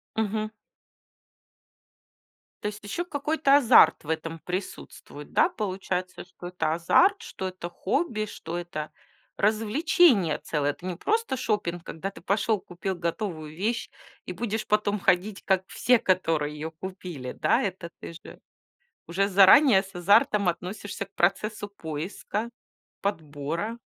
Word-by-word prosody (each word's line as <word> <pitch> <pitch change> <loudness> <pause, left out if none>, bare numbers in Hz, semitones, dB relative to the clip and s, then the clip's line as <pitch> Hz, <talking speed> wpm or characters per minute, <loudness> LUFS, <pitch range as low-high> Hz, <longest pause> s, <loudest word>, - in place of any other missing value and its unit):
Мгм. 215 0 -1 2.1
То 210 - -1
есть 210 0 -6
ещё 270 - -3
какой-то 290 -2 +2
азарт 225 - +6
в 150 - -11
этом 160 0 -3
присутствует, 180 -5 -7
да, 350 - +4
получается, 185 - -4
что 175 0 -10
это 175 -3 -1
азарт, 365 - +4
что 190 - -5
это 185 -2 -6
хобби, 215 - -1
что 170 -4 -6
это 165 -3 -5 0.5
развлечение 220 - +3
целое. 145 -2 -1
Это 170 +5 -13
не 180 -2 -3
просто 440 - 0
шопинг, 190 -8 -2
когда 190 +5 -5
ты 195 - -13
пошёл, 205 +3 +1
купил 185 +2 -5
готовую 170 -3 -4
вещь 225 +7 -2 0.4
и 180 - -5
будешь 220 +2 -3
потом 210 -1 +1
ходить 195 +3 +1
как 190 -1 +2
все, 250 0 +3
которые 165 -5 +1
её 155 +2 -5
купили, 170 -6 -7
да? - - +2
Это 185 -3 -4
ты - - -7
же 165 - -12 0.7
уже 195 +4 +1
заранее 195 +3 +7
с 195 0 -14
азартом 200 +2 +4
относишься 190 +4 -3
к 195 - -30
процессу 205 +1 0
поиска, 195 +5 -5 0.5
подбора. 165 +4 -3
190 Hz, 135 wpm, -26 LUFS, 170-215 Hz, 2.1 s, заранее